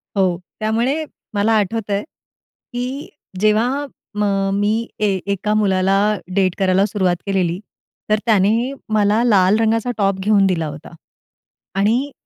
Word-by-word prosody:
हो, 185 -3 +2 0.2
त्यामुळे 235 +8 0 0.3
मला 205 +2 +2
आठवतंय 205 0 -1 0.7
की 255 +4 -4 0.3
जेव्हा 230 +7 +2 0.3
म 210 - +2 0.4
मी 220 +3 0
ए 210 - +2 0.2
एका 205 +2 -1
मुलाला 195 -2 +2 0.4
डेट 185 -3 +2
करायला 190 0 +3
सुरुवात 190 -4 0
केलेली, 185 -3 0 0.5
तर 215 0 +3
त्याने 225 +3 +2 0.2
मला 210 +2 +3
लाल 200 -3 +4
रंगाचा 225 +2 +1
टॉप 195 -2 +1
घेऊन 200 0 +3
दिला 170 -4 0
होता 150 +3 -9 0.9
आणि 240 +8 +1
210 Hz, 120 wpm, -19 LUFS, 195-225 Hz, 0.9 s, लाल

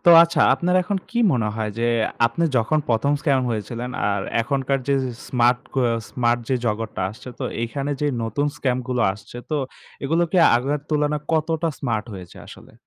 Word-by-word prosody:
তো - - +9
আচ্ছা, 170 -1 +1
আপনার 180 +1 0
এখন 200 +3 -1
কি 235 - -2
মনে 115 -5 +1
হয় 110 -1 -2
যে, 120 - +1 0.4
আপনি 140 +9 -1
যখন 140 +7 +2
১ম 125 +5 +2
scam 140 -4 +2
হয়েছিলেন 115 +3 -4 0.2
আর 100 -1 0 0.2
এখনকার 135 +2 0
যে 140 - +4 0.3
smart, 125 0 +3 0.2
ক - - -8 0.3
smart 120 +2 +1
যে 130 - +2
জগতটা 110 -2 -2
আসছে, 110 +4 -11
তো - - -3 0.2
এখানে 140 +4 -3
যে 150 - +1 0.2
নতুন 115 +6 -1
scam 130 -2 0
গুলো 125 -1 +1
আসছে 105 +3 -12
তো 155 - +1 0.5
এগুলো 165 +5 +2
কি 185 - +2 0.2
আগের 140 +4 -1
তুলনায় 150 0 +1
কতটা 160 +1 +1
smart 115 -6 -1
হয়েছে 90 -2 -10
আসলে? - - -13
130 Hz, 175 wpm, -22 LUFS, 115-150 Hz, 0.5 s, তো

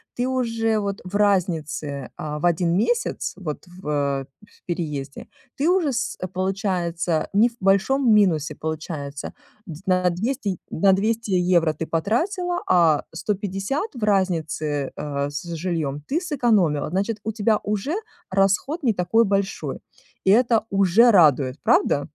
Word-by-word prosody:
Ты 245 +1 -1
уже 230 -4 0
вот 200 -1 -3
в 185 +2 -7
разнице, 160 -9 0
а, 150 -1 -4
в 175 - -2
1 170 0 +2
месяц, 475 - 0
вот 160 -4 -6
в 145 -6 -2 0.2
в - - -27
переезде, 150 -5 -4 0.3
ты 290 +4 +1
уже 355 -6 +2
с 240 - -2 0.2
получается 180 -4 -1
не 225 +4 +5
в - - -21
большом 215 +6 +3
минусе 160 -8 +3
получается, 155 -3 -5 0.3
д 165 -1 -9
на 185 -1 +3
200 210 - -2
на 190 +3 +3
200 220 +2 0
евро 175 -3 +3
ты 160 - -5
потратила, 350 - -1
а 165 -4 +4
150 205 - -3
в 230 - -6
разнице, 160 -8 0
э, 145 -1 -3
с 145 - -5
жильём 155 -4 -2
ты 325 +6 0
сэкономила. 220 - +1
Значит, 200 +4 -1
у 220 - -2
тебя 215 0 +1
уже 210 - -2 0.3
расход 200 - +1
не 230 -4 +3
такой 220 +6 +2
большой. 200 0 -2 0.5
И 190 - +3
это 230 -1 +3
уже 195 +4 +5
радует, 145 -8 +4
правда? 145 - +2
190 Hz, 140 wpm, -23 LUFS, 160-220 Hz, 0.5 s, не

